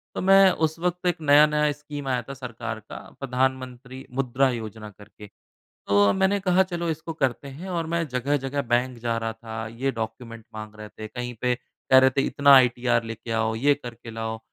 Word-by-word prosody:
तो - - -2
मैं 195 0 +7
उस 160 -2 -1
वक़्त 180 +1 -2
एक 175 -2 0
नया-नया 150 0 +5
स्कीम 145 -1 -8
आया 125 -2 0
था - - -4
सरकार 120 -4 -6
का, 110 - -10 0.2
प्रधानमंत्री 130 -1 -3
मुद्रा 130 0 +1
योजना 110 -2 -6
करके। 105 +1 -14 0.6
तो 100 0 +4
मैंने 190 +1 +1
कहा, 185 0 +3
"चलो, 175 -2 -3
इसको 160 +1 -4
करते 135 -2 -2
हैं।" 150 +8 -9
और 170 -3 -2
मैं 170 0 -1
जगह-जगह 135 +2 -1
बैंक 125 0 +1
जा 115 0 -1
रहा 115 0 -3
था, 110 0 -7
ये 120 +5 -2
डॉक्यूमेंट 115 0 -6
माँग 110 0 -8
रहे 105 0 -9
थे। 110 0 -9
कहीं 125 +2 -6
पे 125 0 +2
कह 130 - +2
रहे 130 0 +6
थे, 135 +1 0
"इतना 140 -1 +5
आईटीआर 125 -2 +3
लेके 110 +1 -7
आओ, 110 0 0
ये 140 +6 +3
करके 120 -4 -10
लाओ।" 110 0 -4
130 Hz, 190 wpm, -25 LUFS, 115-150 Hz, 0.6 s, मैं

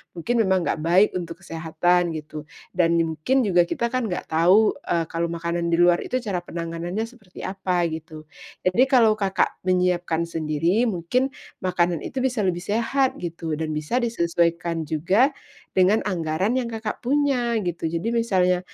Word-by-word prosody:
mungkin 230 +8 -1
memang 190 -4 +2
gak - - -1
baik 180 +6 +4
untuk 170 -1 -8
kesehatan 165 +1 0
gitu, 155 0 -7 0.3
dan 170 -2 +2
mungkin 165 - +1
juga 180 -5 +3
kita 235 +4 -2
kan 255 -3 -1
gak 180 -4 -5
tau, 180 +7 +5 0.2
eee, 170 -1 +1
kalau 170 0 -1
makanan 170 0 -2
di 170 - +2
luar 175 0 +4
itu - - -4
cara 200 -5 -2
penanganannya 170 +4 -4
seperti 225 -6 -11
apa 185 -2 -1
gitu. 160 -1 -8 0.4
Jadi 185 +8 +4
kalau 225 -5 +4
Kakak 195 -1 0
menyiapkan 180 -2 +1
sendiri 165 +7 0
mungkin 220 +7 0 0.3
makanan 175 -3 0
itu 260 - -4
bisa 255 -3 0
lebih 180 -3 0
sehat 235 +6 0
gitu, 165 -2 -4
dan 155 -1 -2
bisa 155 +12 -1
disesuaikan 170 -6 0
juga 190 - +2 0.4
dengan 190 +4 +4
anggaran 185 +4 -1
yang 245 -2 -1
Kakak 220 0 -5
punya 255 -3 +1
gitu, 170 -2 -2
jadi 170 +6 -2
misalnya 185 -6 +2
180 Hz, 155 wpm, -23 LUFS, 165-220 Hz, 0.4 s, tau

